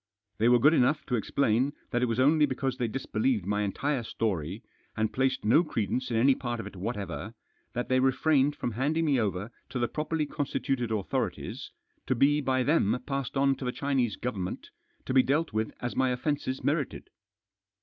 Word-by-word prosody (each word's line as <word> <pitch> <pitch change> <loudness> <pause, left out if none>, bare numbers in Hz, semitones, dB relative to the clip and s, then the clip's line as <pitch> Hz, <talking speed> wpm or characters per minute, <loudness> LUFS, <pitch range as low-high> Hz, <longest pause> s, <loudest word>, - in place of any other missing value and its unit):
They 115 +2 +4
were 125 - +6
good 145 +6 +5
enough 150 +1 +2
to 125 - 0
ex* 110 - -3
plain 135 +1 +2 0.2
that 120 -1 +1
It 125 - +2
was 115 +1 -1
only 150 +3 +5
because 130 -1 -2
they 120 - 0
disbelieved 115 -3 -1
my 105 +1 0
entire 130 +7 -1
story, 100 -3 -3 0.3
and 110 0 0
placed 130 -2 0
no 120 +10 +5
credence 130 - -2
in 115 - 0
any 135 +4 +5
part 120 -2 -4
of 110 - -5
it 100 - -9
whatever, 100 -1 -5 0.4
that 120 - -2
they 130 0 +3
refrained 135 +2 +3
from 120 - -3
handing 145 +8 0
me 140 -4 +3
over 105 0 -2 0.2
to - - -4
the 120 -1 +1
properly 155 +2 -2
constituted 135 -4 -2
authorities, 105 -3 -3 0.4
to 130 - +2
be 145 +4 +3
by 130 -1 +1
them 125 -5 +2
passed 135 -1 -3
on 135 0 +4
to 130 - -6
the 125 - 0
Chinese 130 -6 0
Government, 100 -7 -4 0.3
to - - -2
be 130 - +7
dealt 150 +2 0
with 110 0 -1
as 120 - -3
my 130 -1 +2
offences 130 +1 -2
merited. 145 -1 -1
125 Hz, 190 wpm, -28 LUFS, 110-140 Hz, 0.4 s, be